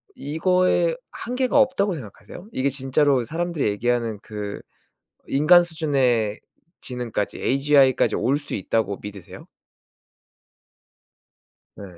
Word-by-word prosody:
이거에 185 - +1 0.2
한계가 255 +3 0
없다고 255 -8 +2
생각하세요? 115 - -11
이게 140 - 0
진짜로 135 0 +1
사람들이 165 +1 -2
얘기하는 115 0 -1
그 105 -1 -6 0.7
인간 160 +6 +5
수준의 135 -10 0 0.4
지능까지 120 -5 -4
AGI까지 135 -4 +3
올 125 +6 +1
수 145 -1 -5
있다고 100 0 -1
믿으세요? 100 -2 -10 2.3
네. - - -9
135 Hz, 260 characters per minute, -23 LUFS, 110-170 Hz, 2.3 s, 인간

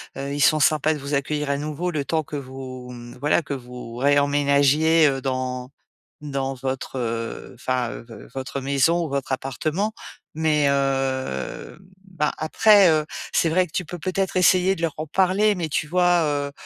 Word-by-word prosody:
heu, 140 +1 -4
ils 145 - -2
sont 155 +2 +5
sympas 155 +1 +3
de 150 - -6
vous 140 +1 -3
accueillir 150 +1 -1
à 140 - +1
nouveau 155 +4 -3
le 150 -5 -2
temps 160 +1 0
que 150 - -8
vous, 130 -2 -7
mmh, 120 0 -10
voilà 145 +5 +2
que 145 -3 -5
vous 125 -2 -9
réemménagiez, 145 +3 +3
heu, 135 -1 -1
dans 130 -1 -3 0.5
n 145 - -6
dans 135 -1 -2
votre, 130 0 -4
heu, 115 -1 -4
enfin, 125 -1 -1
heu, - - -9
v 115 - -12
votre 135 +1 -4
maison 140 +6 +2
ou - - -5
votre 135 -1 -3
appartement 155 - -2 0.5
mais, 155 -2 +2
heu, 135 - -2 0.3
ben, 180 -6 -1
après, 200 +4 +5
heu, 155 -1 +2 0.3
c'est - - +2
vrai 180 +3 +2
que - - -23
tu 180 - -2
peux 175 +3 -7
peut-être 190 +3 -2
essayer 185 +1 +4
de 165 - -8
leur 165 -3 0
en 155 +1 -4
parler 190 +5 +2
mais, 170 -4 -3
tu 150 +1 -1
vois? 175 0 +3
Heu, 145 -2 -1
145 Hz, 185 wpm, -23 LUFS, 135-160 Hz, 0.5 s, sont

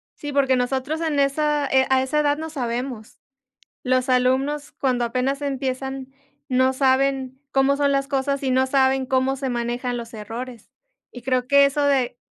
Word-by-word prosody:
Sí, 290 -1 -6
porque 270 -2 +2
nosotros 265 +5 -1
en 310 -3 0
esa, 295 +1 +1
eh, 265 0 +3
a 265 0 +4
esa 290 +3 0
edad 290 0 +2
no 320 0 -5
sabemos. 245 -4 -4 0.7
Los 255 0 +1
alumnos, 260 +3 +1
cuando 250 -3 0
apenas 260 +4 -1
empiezan, 265 -1 -4 0.4
no 260 0 +3
saben 265 0 +1
cómo 270 +1 +2
son 280 -1 +2
las 275 0 0
cosas 275 0 -1
y 265 - 0
no 260 +1 +3
saben 265 0 +2
cómo 265 0 +1
se 265 -1 -3
manejan 245 +1 -2
los 235 -1 -7
errores. 230 +2 -8 0.4
Y 245 - -11
creo 255 0 0
que 280 +1 +6
eso 285 +1 -1
de 270 -4 +1
265 Hz, 170 wpm, -22 LUFS, 255-280 Hz, 0.7 s, que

